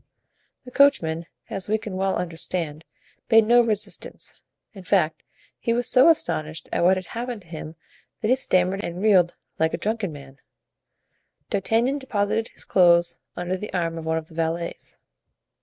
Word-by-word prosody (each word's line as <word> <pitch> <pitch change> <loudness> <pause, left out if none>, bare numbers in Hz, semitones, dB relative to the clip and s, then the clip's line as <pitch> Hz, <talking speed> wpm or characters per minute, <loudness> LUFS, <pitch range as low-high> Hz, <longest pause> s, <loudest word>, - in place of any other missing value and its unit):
The 250 - -10
coachman, 170 - +3 0.2
as 195 0 -5
we 215 - +3
can 215 -3 -7
well 190 0 0
understand, 165 -2 -2 0.4
made 225 -2 +6
no 240 +2 +6
resistance; 215 -2 -4 0.3
in 195 -3 -11
fact, 175 -3 +1 0.4
he 230 - 0
was 245 +1 0
so 255 +5 +6
astonished 155 - 0
at - - 0
what 185 +2 +5
had 185 - -5
happened 235 0 -5
to - - -23
him 160 -1 -7 0.5
that 215 - 0
he 255 - +5
stammered 190 -5 +1
and 170 +1 -5
reeled 190 -4 +4 0.2
like 160 +1 +2
a - - -5
drunken 210 0 -2
man; 135 -2 -12 1.1
D'Artagnan 230 +8 +1
deposited 225 -3 -1
his - - -8
clothes 175 -2 +4 0.2
under 175 +1 -2
the 210 +3 -6
arm 165 -2 -1
of 160 - -8
one 160 0 0
of 160 -1 -5
the 165 - -17
valets. 165 +1 -3
185 Hz, 165 wpm, -24 LUFS, 165-225 Hz, 1.1 s, made